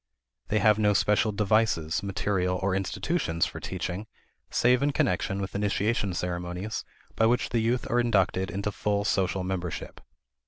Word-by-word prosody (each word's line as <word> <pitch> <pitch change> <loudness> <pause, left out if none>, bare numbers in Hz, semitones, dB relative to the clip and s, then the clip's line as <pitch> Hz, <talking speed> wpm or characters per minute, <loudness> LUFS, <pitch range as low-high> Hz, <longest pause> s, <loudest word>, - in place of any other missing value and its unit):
They 110 - +1
have 105 -1 +4
no 105 -1 +4
special 105 +3 +3
devices, 100 -6 +1
material, 90 -1 -1
or 95 -1 +1
institutions 95 - 0
for - - -6
teaching 100 +5 -4 0.4
save 125 +2 +3
in 145 0 +1
connection 95 -1 0
with 95 -1 -4
initiation 100 -1 0
ceremonies 90 +4 -3 0.3
by 110 - +4
which 120 +2 +1
the 120 - +1
youth 120 +2 0
are 120 - +2
inducted 95 -6 +1
into 100 +4 -2
full 100 0 -1
social 95 -2 +1
membership. 90 -3 -4
100 Hz, 150 wpm, -27 LUFS, 90-110 Hz, 0.4 s, have